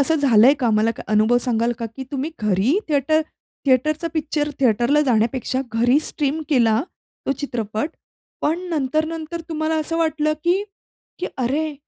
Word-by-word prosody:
असं 320 +4 +3
झालंय 265 -3 +5
का? 245 - +2
मला 215 +1 +3
काही 215 -1 -6
अनुभव 220 +3 +4
सांगाल 235 -1 +1
का 230 - -3
की 265 - -5
तुम्ही 280 +4 -2
घरी 210 - +2
थिएटर 300 +2 +2 0.5
थिएटरचा 305 +6 +2
पिक्चर 300 -1 -1
थिएटरला 240 +4 +3
जाण्यापेक्षा 245 +2 +1
घरी 245 +5 +3
स्ट्रीम 300 0 -2
केला 235 -5 +3 0.5
तो - - +2
चित्रपट, 225 -2 -3 0.5
पण 320 +3 +1
नंतर-नंतर 315 +3 -2
तुम्हाला 315 0 -1
असं 330 +2 -3
वाटलं 310 -1 +1
की 365 +4 +2 0.6
की 360 - -2
अरे, 290 +5 -1
275 Hz, 145 wpm, -21 LUFS, 235-310 Hz, 0.6 s, झालंय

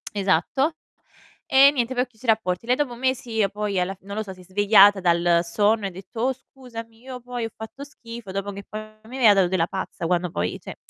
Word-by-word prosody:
Esatto. 200 - +1 0.7
E, 275 +1 +7
niente, 255 -2 -1
poi 250 - +2
ho - - -3
chiuso 245 0 -15
i - - -12
rapporti. 220 -2 +1
Lei 250 +1 +3
dopo 275 -4 -1
mesi, 240 -3 -1
poi 205 -2 -2
alla 185 +2 -1
f - - -27
non 200 +1 -8
lo 220 - -1
so, 195 - -8
si 185 - -17
è - - -14
svegliata 205 +1 +5
dal 170 -1 +3
sonno 205 +5 +1
e 195 - 0
ha - - -8
detto: 190 +5 -9
"Oh, 260 +3 +2
scusami, 230 -3 -11
io 255 -1 -8
poi 245 -1 -5
ho - - -7
fatto 220 +6 -9
schifo." 235 -7 -10
Dopo 195 +1 -3
che 200 0 -9
poi 215 - -5 0.2
mi 245 +4 -9
aveva 235 -5 +6
dato 190 -2 +3
della 175 -2 +1
pazza 185 -2 -5
quando 180 0 0
poi, 90 - -2
cioè - - -8
215 Hz, 235 wpm, -24 LUFS, 190-245 Hz, 0.7 s, E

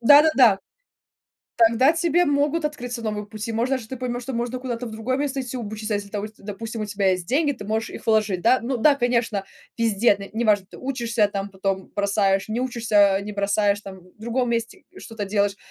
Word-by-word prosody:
Да-да-да. 270 -5 +6 1.0
Тогда 235 +5 +5
тебе 340 +1 +2
могут 290 +2 +1
открыться 245 -5 -4
новые 210 -2 -3
пути. 215 +2 -6
Может, 235 +4 0
даже 235 -4 -5
ты 260 - -5
поймёшь, 245 -1 -3
что 265 - -5
можно 240 +2 -3
куда-то 245 -1 -4
в - - -6
другое 230 +4 -2
место 275 -1 -2
идти 255 0 -5
обучиться. 215 -1 -4
Если 205 0 -3
та 205 - -3
вости 215 +1 -9
допустим, 220 +2 -6
у - - -1
тебя 200 -2 +1
есть 180 -2 -2
деньги, 290 - +2
ты 240 - -9
можешь 220 +2 -2
их - - -10
вложить, 215 -4 +2
да. 255 +3 +4
Ну 255 +2 -1
да, 285 +5 +5
конечно, 235 -6 0 0.3
везде, 225 -2 +3
на 200 - -8
неважно, 210 -5 +2
ты - - -12
учишься 235 -5 0
там, 200 0 -3
потом 190 0 -3
бросаешь, 200 -1 +1
не 230 +3 -2
учишься, 215 -6 +3
э, - - -6
не 210 - -6
бросаешь 200 0 +1
там, 195 -2 -10 0.2
в - - -36
другом 235 +2 -1
месте 235 +10 -3
что-то 225 - -6
делаешь. 200 0 0
225 Hz, 205 wpm, -23 LUFS, 205-255 Hz, 1.0 s, Да-да-да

